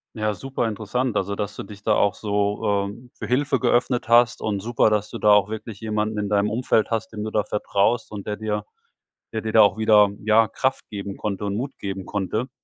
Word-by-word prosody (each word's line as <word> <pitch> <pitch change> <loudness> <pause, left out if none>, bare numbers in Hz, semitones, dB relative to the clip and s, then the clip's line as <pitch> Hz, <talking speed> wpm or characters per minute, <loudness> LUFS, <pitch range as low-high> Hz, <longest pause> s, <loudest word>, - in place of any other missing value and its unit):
Ja, 110 -1 0
super 135 +2 -3
interessant, 110 +3 -2
also 100 +1 -1
dass 105 0 -4
du - - -6
dich 100 0 -11
da 110 - +3
auch 100 -2 +2
so, 100 -1 0
äh, 120 +5 -12
für - - -7
Hilfe 135 +3 +1
geöffnet 120 0 +1
hast 120 0 +4
und 105 -2 -1
super, 115 +2 +2
dass 105 -1 -1
du - - -6
da 105 - +3
auch 105 -1 +4
wirklich 110 -1 -7
jemanden 110 0 -1
in 105 -1 -2
deinem 105 0 +2
Umfeld 110 -1 +1
hast, 110 -1 -2
dem 105 -1 -4
du 110 - -3
da 105 -1 +1
vertraust 105 +2 0
und 105 -2 -7
der 105 - -2
dir 105 -1 -3 0.7
der 110 - -2
dir 110 0 -4
da 110 - +6
auch 100 0 +4
wieder, 105 -2 +5
ja, 110 +1 +5
Kraft 130 +4 -2
geben 100 -1 -6
konnte 105 -1 -3
und 100 0 -2
Mut 135 +4 -4
geben 95 -1 -5
konnte. 105 +4 -2
105 Hz, 225 wpm, -23 LUFS, 100-115 Hz, 0.7 s, da